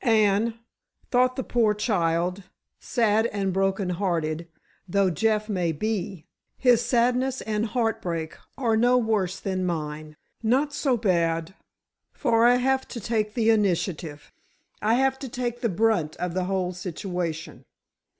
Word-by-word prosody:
And, 220 -1 +3 0.6
thought 255 0 +3
the 260 - -2
poor 225 -4 +2
child, 180 -3 0 0.4
sad 225 -2 +2
and 195 -4 -2
broken 195 0 0
hearted 170 -3 -1 0.4
though 195 0 +2
Jeff 215 +5 +1
may 180 -6 0
be, 190 0 -3 0.3
his 245 -2 +4
sadness 250 +2 +1
and 220 +1 -1
heartbreak 180 -9 -2 0.2
are 235 -4 +1
no 245 +3 +4
worse 205 -6 0
than 185 -1 -2
mine. 155 -3 -4 0.2
Not 265 +6 +1
so 265 -5 +1
bad, 170 -4 0 0.6
for 230 0 +2
I 245 - +6
have 265 +1 +1
to 240 - -6
take 215 -1 -1
the 225 -2 +3
initiative! 175 -7 -1 0.5
I 220 +2 +3
have 265 +1 +1
to 265 - -6
take 240 -1 -3
the 235 - +1
brunt 195 -5 +1
of 180 -1 -3
the 185 0 -1
whole 185 -1 -1
situation. 175 -2 -5
210 Hz, 140 wpm, -25 LUFS, 180-235 Hz, 0.6 s, I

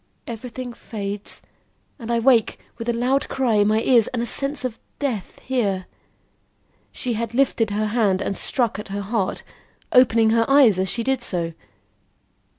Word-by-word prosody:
Everything 245 +1 -7
fades, 205 -3 -6 0.6
and 230 -2 -8
I 235 - +2
wake 230 -1 +3 0.2
with 230 +1 -3
a - - +4
loud 250 +4 0
cry 260 -4 0
in 205 0 +4
my 215 +1 +2
ears 240 -4 +4
and 235 -2 -2
a - - -1
sense 275 +2 0
of 235 -3 -4 0.2
death 245 -10 -3
here." 200 -8 -1 1.1
She 245 - -3
had 230 +1 -3
lifted 240 -4 +2
her 210 +1 -1
hand 210 -4 +1
and 195 - -2
struck 235 -2 -1
at 210 - -7
her 200 +1 -4
heart, 200 -1 -2 0.5
opening 230 -3 +5
her 230 +1 +2
eyes 265 -9 +6
as 190 0 0
she 235 - 0
did 265 0 0
so. 170 -7 -2
230 Hz, 165 wpm, -22 LUFS, 210-250 Hz, 1.1 s, eyes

